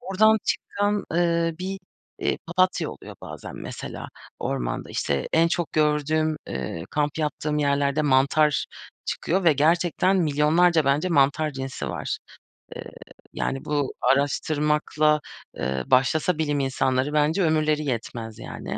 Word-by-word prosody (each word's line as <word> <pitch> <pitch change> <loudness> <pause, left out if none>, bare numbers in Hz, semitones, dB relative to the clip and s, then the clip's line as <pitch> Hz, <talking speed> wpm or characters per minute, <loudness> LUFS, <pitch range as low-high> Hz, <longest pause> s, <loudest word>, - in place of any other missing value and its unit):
oradan 220 -1 +3
çıkan, 205 0 -1
ııı, 170 -1 +2
bir, 190 +1 -4 0.5
ııı, - - +1
papatya 185 +2 +1
oluyor - - -11
bazen, - - -8
mesela, - - -7 0.3
ormanda. - - -3
İşte, 70 -1 -1
en 165 +1 +4
çok 175 -1 -2
gördüğüm, 155 +1 +1
ııı, 65 +6 -4
kamp 150 +1 -1
yaptığım 150 0 -1
yerlerde 140 +1 +1
mantar 140 +2 +3 0.4
çıkıyor 185 +2 -1
ve 160 - +6
gerçekten 170 +5 +2
milyonlarca 160 +1 +3
bence 145 +6 +2
mantar 150 0 +2
cinsi 135 -2 -5
var. - - -3 0.6
Iıı, - - -6 0.5
yani, 135 - -3
bu 145 -2 -1
araştırmakla, 150 +3 +2 0.4
ııı, 65 -1 -1
başlasa 155 +6 +3
bilim 145 -2 0
insanları 135 +1 0
bence 155 +5 +2
ömürleri 155 -1 +2
yetmez, 115 -3 -4
yani. - - -6
150 Hz, 125 wpm, -24 LUFS, 140-165 Hz, 0.6 s, ve